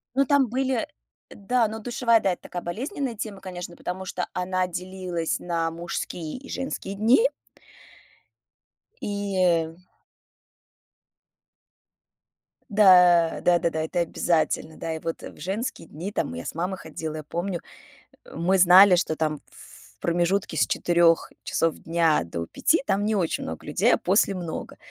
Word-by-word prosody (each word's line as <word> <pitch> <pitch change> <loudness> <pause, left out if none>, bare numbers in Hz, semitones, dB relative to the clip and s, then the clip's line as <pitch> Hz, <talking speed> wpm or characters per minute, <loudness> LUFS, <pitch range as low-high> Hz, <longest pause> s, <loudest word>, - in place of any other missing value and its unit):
Ну, 275 0 +3
там 275 -1 +3
были 260 0 -1 0.4
да, 230 +3 0
но 220 +1 -6
душевая, 235 0 +2
да, 195 - +1
это - - -12
такая 175 - -6
болезненная 255 - -4
тема, 205 -2 -6
конечно, 180 -2 -7
потому 190 +1 -5
что 180 -1 -3
она 185 0 -1
делилась 180 -2 -3
на 165 -2 -1
мужские 170 +1 -5
и 275 +1 -12
женские 265 -7 -4
дни. 230 - +4 1.8
И, 200 -1 -3
э 165 -2 +2 2.9
Да, 180 -5 +6
да-да-да, 170 -2 +2
это 165 +2 -2
обязательно, 160 -2 0
да. 160 -1 -4
И - - -5
вот 165 0 -5
в - - -10
женские 190 0 -4
дни 180 +7 -6
там - - -1
мы 85 - -6
я 85 - -7
с - - -5
мамой 185 +3 -2
ходила, 155 0 -6
я 155 - -6
помню, 175 +3 -3 0.6
э, - - -14
мы 185 +4 +1
знали, 180 +1 +8
что 160 -2 0
там 155 -2 -1
в - - -17
промежутке 175 0 0
с - - +3
4 170 -1 +2
часов 165 -1 0
дня 165 -2 +1
до 85 0 -5
5 315 - +1
там 200 +1 +1
не 215 0 +1
очень 170 -4 -1
много 80 0 -7
людей, - - +3
а - - +3
после 195 +1 +2
много. 170 -3 -6
180 Hz, 150 wpm, -25 LUFS, 165-205 Hz, 2.9 s, знали